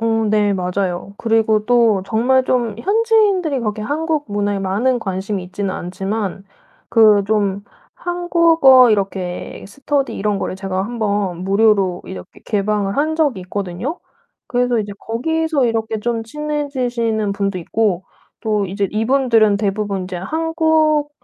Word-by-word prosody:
어. 225 -1 +1
네. 210 -1 +2
맞아요. 185 0 -2
그리고 220 -2 +1
또 230 -5 +3
정말 255 +5 +2
좀 235 -5 0
현지인들이 400 - +2
그렇게 215 -1 -3
한국 305 +4 -1
문화에 205 -1 -1
많은 220 +7 0
관심이 190 -1 -3
있지는 195 +2 -4
않지만 195 +2 -4 0.4
그 215 -3 +5
좀 200 -2 0 0.3
한국어 335 -8 +4
이렇게 190 -3 -3
스터디 275 +6 -2
이런 205 0 -1
거를 - - -3
제가 190 -1 -3
1 240 +3 -6
번 205 -5 -1
무료로 195 -2 +2
이렇게 90 -1 -10
개방을 205 -1 -1
한 310 +3 0
적이 290 - +1
있거든요. 190 - -4 0.5
그래서 245 -1 +1
이제 205 -1 -3
거기서 315 +5 -1
이렇게 225 -1 -1
좀 230 0 -1
친해지시는 245 -6 -2
분도 200 -1 -2
있고 190 +1 -1 0.4
또 215 -2 0
이제 200 +2 -1
이분들은 225 -2 +3
대부분 200 -1 -2
인제 180 0 -6
한국 315 - +1
220 Hz, 295 characters per minute, -18 LUFS, 200-265 Hz, 0.5 s, 그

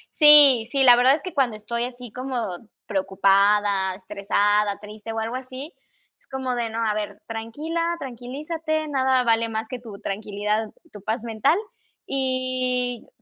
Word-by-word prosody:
Sí, 290 -7 +8
sí, 275 -1 +2
la 245 -2 +8
verdad 255 +3 +5
es 310 - -9
que 365 -3 -6
cuando 255 -7 +1
estoy 235 +3 -3
así 245 -2 -9
como 255 +1 -5 0.5
preocupada, 195 0 +2
estresada, 205 +1 0
triste 215 +1 -9
o 225 - -5
algo 225 +3 -3
así, 260 +5 -7 0.5
es - - -22
como 265 -1 -3
de: 235 -2 -2
"No, 225 +1 -2
a 210 - +1
ver, 210 -1 -5
tranquila, 260 +10 -4 0.2
tranquilízate, 305 +5 -4
nada 260 -2 +2
vale 230 -1 +2
más 220 0 -4
que 250 0 -6
tu 220 -4 -10
tranquilidad, 210 +2 -2 0.2
tu 205 - -11
paz 220 +3 -3
mental", 235 - +1 0.5
y 255 -2 -1
235 Hz, 155 wpm, -23 LUFS, 210-260 Hz, 0.5 s, Sí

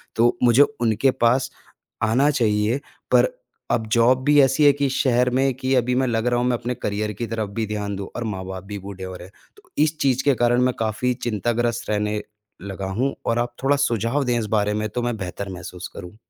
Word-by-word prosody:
तो 120 +1 +3
मुझे 125 +4 +6 0.2
उनके 115 +3 +2
पास 125 +3 +3 0.5
आना 125 +7 +3
चाहिए। 110 -2 +1 0.3
पर - - +5 0.4
अब 110 -2 0
जॉब 125 +3 +4
भी 145 0 +5
ऐसी 135 +3 +3
है 145 - +8
कि 145 -1 0
शहर 125 -1 +2
में 135 +1 +1
कि 130 0 -1
अभी 125 0 +1
मैं 130 0 +1
लग 115 0 0
रहा 120 0 +2
हूँ, 125 - +1
मैं 120 -1 +1
अपने 120 +1 -3
करियर 105 +1 -2
की 115 +4 -4
तरफ़ 110 -2 -3
भी 110 +1 -2
ध्यान 105 -1 -3
दूँ 100 0 -5
और 120 - -3
माँ-बाप 95 -3 -5
भी 105 0 -6
बूढ़े 95 -1 -8
हो 95 0 -6
रहे 90 0 -10
हैं। - - -21 0.2
तो - - -22
इस 155 0 0
चीज़ 130 -1 +1
के 140 - +4
कारण 120 +1 +2
मैं 125 0 +2
काफ़ी 110 +3 0
चिंताग्रस्त 120 0 -2
रहने 105 0 0 0.4
लगा 95 -1 -5
हूँ 135 +2 0
और 115 +1 +1
आप 120 0 -2
थोड़ा 140 +1 +4
सुझाव 115 +5 0
दें 120 -2 0
इस 110 - -2
बारे 105 0 +1
में - - -1
तो 120 +4 -3
मैं 120 -2 -2
बेहतर 95 +1 -5
महसूस 90 0 -8
करूँ। 90 +2 -9
120 Hz, 220 wpm, -22 LUFS, 105-125 Hz, 0.5 s, है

